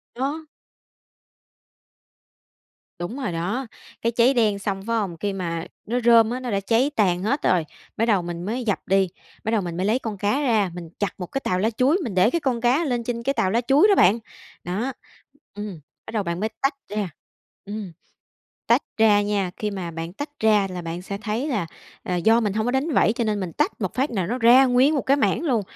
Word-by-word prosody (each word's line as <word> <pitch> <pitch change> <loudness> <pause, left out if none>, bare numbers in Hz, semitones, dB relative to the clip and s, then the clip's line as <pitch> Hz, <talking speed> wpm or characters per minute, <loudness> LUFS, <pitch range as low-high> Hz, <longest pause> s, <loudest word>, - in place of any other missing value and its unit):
Đó. 285 +6 -3 2.5
Đúng 205 +10 -4
rồi 255 -9 -2
đó. 200 +10 -2 0.3
Cái 230 - +1
cháy 240 +3 +4
đen 215 -5 +2
xong, 195 -1 -3
phải 230 - 0
hông? 185 -6 -2
Khi 200 +3 -2
mà 170 -3 -3 0.2
nó 245 +3 -1
rơm 230 -1 +6
á, 250 - -2
nó 250 -2 -4
đã 200 - +1
cháy 230 +8 +1
tàn 185 -4 +2
hết 275 +7 0
rồi, 175 -3 +2 0.3
bắt 225 - +2
đầu 205 -5 +3
mình 175 0 -5
mới 240 +5 -2
dập 205 -4 0
đi, 195 0 +3 0.4
bắt 220 - -1
đầu 220 -3 +2
mình 170 -2 -5
mới 185 - 0
lấy 230 +5 +2
con 215 -5 -5
cá 210 +9 0
ra, 220 -8 +2
mình 175 -2 -8
chặt 200 -3 -2
một 180 - -3
cái 270 - -2
tàu 180 - 0
lá 215 +4 +2
chuối, 255 - +2
mình 225 -8 -4
để 185 +4 +5
cái 340 +2 -1
con 245 -4 -1
cá 255 +7 +3
lên 245 -3 -1
trên 235 0 -3
cái 275 - +1
tàu 190 -8 +1
lá 235 +3 +2
chuối 295 +10 +6
đó 405 - +5
bạn. 210 - +5 0.4
Đó, 215 +10 -2 0.6
ừm, 205 -5 -6 0.3
bắt - - -8
đầu 210 -3 0
bạn 170 0 -3
mới 220 +2 -1
tách 275 +1 +1
ra, 205 -2 -2 0.6
ừm 205 -3 -6 0.8
tách - - +4
ra 215 -2 +5
nha, 205 -3 -1
khi 210 -1 -2
mà 180 -4 -5
bạn 165 +1 -6
tách 290 +9 -5
ra 210 -3 +3
là 180 -1 -5
bạn 165 +1 -5
sẽ 200 +2 -5
thấy 225 +7 -2
là, 210 - -1 0.4
à, 180 - -2
do 220 +7 +4
mình 210 -3 0
hông 220 +1 0
có 245 - +1
đánh 270 +5 0
vảy, 215 - +4
cho 235 - -1
nên 215 -2 0
mình 180 -4 -4
tách - - -1
một 190 - -2
phát 265 +2 0
nà 190 -6 -1
nó 245 +5 -1
ra 250 +3 +7
nguyên 260 +4 +4
một 280 - +1
cái 275 +2 +2
mảng 305 - +1
luôn, 245 -9 +1
215 Hz, 230 wpm, -23 LUFS, 190-245 Hz, 2.5 s, ra